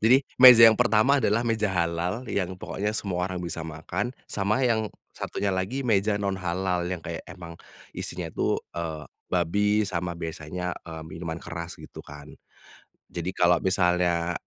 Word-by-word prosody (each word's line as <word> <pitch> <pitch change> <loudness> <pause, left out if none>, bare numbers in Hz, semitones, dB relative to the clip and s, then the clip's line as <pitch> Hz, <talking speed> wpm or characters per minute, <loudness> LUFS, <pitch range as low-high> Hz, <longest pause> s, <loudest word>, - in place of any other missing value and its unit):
jadi 120 +4 +7 0.2
meja 125 -3 +11
yang 110 -1 +7
pertama 125 +4 +4
adalah 110 +1 +1
meja 110 -2 0
halal 90 +5 -1
yang 95 -5 -2
pokoknya 105 +3 -3
semua 90 -3 -2
orang 90 - -5
bisa 85 -1 -4
makan 80 +9 -4
sama 105 +6 0
yang 110 -3 +1 0.2
satunya 100 -1 -3
lagi 100 +9 -2
meja 105 -2 +2
non 100 -2 -2
halal 90 0 -1
yang 90 -2 -5
kayak 85 -1 -5
emang, 85 -1 -9 0.4
isinya - - -5
itu, - - 0 0.2
eee, 80 -3 -5 0.2
babi 105 +5 +1
sama 90 -3 -3
biasanya, 85 +2 -5
eee, 80 -1 -8
minuman 80 0 -6
keras 85 0 -7
gitu - - -11
kan, 75 0 -12 0.7
jadi 85 +1 -5
kalau 90 -1 +4
misalnya 90 -2 +1
90 Hz, 155 wpm, -26 LUFS, 85-105 Hz, 0.7 s, meja